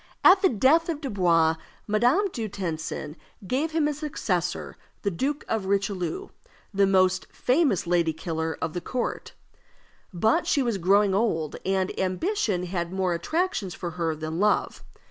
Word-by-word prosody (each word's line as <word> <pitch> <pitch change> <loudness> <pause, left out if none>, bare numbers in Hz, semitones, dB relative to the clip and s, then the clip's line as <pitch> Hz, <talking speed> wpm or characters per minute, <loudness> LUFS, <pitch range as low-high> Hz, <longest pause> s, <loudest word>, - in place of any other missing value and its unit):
At 375 +1 +7
the 380 - +5
death 280 - +3
of 320 -3 -2
Dubois, 175 - +2 0.3
Madame 245 - +3
du 225 -2 -3
Tencin 160 -5 -4 0.3
gave 275 - 0
him 315 -1 +1
as 300 -1 -3
successor 180 - -2 0.3
the 200 - +1
Duke 275 - -2
of 215 -4 -1
Richelieu, 200 - -1 0.4
the 200 0 +3
most 185 -1 +3
famous 255 - +1
lady 170 -1 +2
killer 160 0 -3
of 160 -1 -2
the 175 - -3
court. 245 +7 -3 0.8
But 220 - +1
she 280 - +2
was 230 -5 -1
growing 195 +3 +4
old, 180 -8 0
and 190 -1 0
ambition 190 - 0
had 175 -1 -3
more 190 -2 0
attractions 230 - -1
for 175 -2 -5
her 165 -2 -2
than 155 +2 -4
love. 210 +1 +1
195 Hz, 150 wpm, -26 LUFS, 175-260 Hz, 0.8 s, At